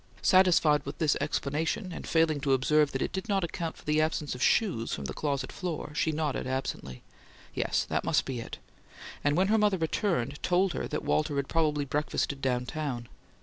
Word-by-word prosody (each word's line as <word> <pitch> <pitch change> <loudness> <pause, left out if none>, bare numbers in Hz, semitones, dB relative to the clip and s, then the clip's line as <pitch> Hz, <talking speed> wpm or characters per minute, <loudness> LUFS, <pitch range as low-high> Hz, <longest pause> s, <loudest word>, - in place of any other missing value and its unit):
Satisfied 180 -5 +5
with 140 - -7
this 155 -3 +2
explanation, 160 +7 -1
and - - -7
failing 160 -2 +2
to 135 -1 +1
observe 145 +2 +3
that 135 - -1
it - - -3
did 190 +1 -5
not 195 -2 +2
account 165 -1 -4
for - - -16
the 150 +1 +2
absence 155 -2 -1
of 125 - -7
shoes 170 - +2
from 70 - -3
the 65 - -4
closet 140 -3 -2
floor, 170 -5 -4
she 160 +1 +1
nodded 150 -4 -2
absently, 130 - -4 0.5
"Yes, - - 0
that - - -1
must 145 -3 +2
be 130 -3 -4
it"; 115 - -7 0.7
and, 145 +1 +2
when 190 +2 +3
her 220 +1 +4
mother 205 -2 +3
returned, 160 - -1
told 185 0 +2
her - - -3
that 150 - -4
Walter 155 -1 +1
had 140 -1 -1
probably 150 -3 +1
breakfasted 145 0 -1
down 125 -2 0
town. 125 -5 -4
150 Hz, 195 wpm, -29 LUFS, 135-165 Hz, 0.7 s, Satisfied